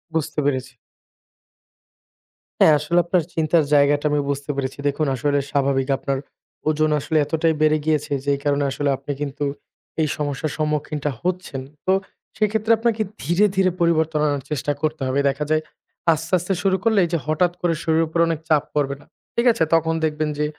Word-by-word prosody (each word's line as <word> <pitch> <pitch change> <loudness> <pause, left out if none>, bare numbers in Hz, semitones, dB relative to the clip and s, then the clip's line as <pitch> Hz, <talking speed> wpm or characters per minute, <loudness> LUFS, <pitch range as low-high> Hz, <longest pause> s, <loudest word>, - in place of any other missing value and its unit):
বুঝতে 160 -1 -1
পেরেছি। 130 -2 -1 1.9
হ্যাঁ, 155 - +7
আসলে 160 +4 -1
আপনার 175 -1 +2
চিন্তার 160 0 +2
জায়গাটা 145 +1 +4
আমি 150 - +2
বুঝতে 140 +1 -3
পেরেছি। 135 -1 -3
দেখুন 150 +2 0
আসলে 145 +3 +1
স্বাভাবিক, 135 -1 +1
আপনার 135 -1 -2 0.5
ওজন 155 0 +2
আসলে 160 +3 -1
এতটাই 160 +2 +1
বেড়ে 155 0 +4
গিয়েছে, 150 -2 0
যে 145 - -2
এই - - -8
কারণে 145 0 +2
আসলে 145 +1 -1
আপনি 140 +2 -6
কিন্তু 145 0 -3 0.6
এই 155 - +2
সমস্যার 145 +1 -2
সম্মুখীনটা 150 -1 -1
হচ্ছেন। 180 -7 -3 0.2
তো 185 - +2 0.5
সেক্ষেত্রে 220 +1 +1
আপনাকে 225 -1 +1 0.2
ধীরে, 175 +7 +3
ধীরে 190 -1 +3
পরিবর্তন 160 -2 +2
আনার 145 -3 -1
চেষ্টা 145 0 -1
করতে 155 -1 -1
হবে। 135 +2 0
দেখা 140 +2 -2
যায় 155 0 +3 0.5
আস্তে, 160 +3 -5
আস্তে 180 +3 -2
শুরু 190 -1 +3
করলে 220 -3 +3
এই - - -5
যে - - +3
হঠাৎ 170 +3 +2
করে 175 -1 +2
শরীরের 160 0 +2
উপর 165 +1 -2
অনেক 165 -2 -1
চাপ 150 -2 +4
পড়বে 140 -2 0
না। - - -19 0.3
ঠিক 235 +1 +1
আছে? 230 - +1
তখন 165 0 +2
দেখবেন 155 0 -1
যে 150 - +1
155 Hz, 175 wpm, -22 LUFS, 145-165 Hz, 1.9 s, হ্যাঁ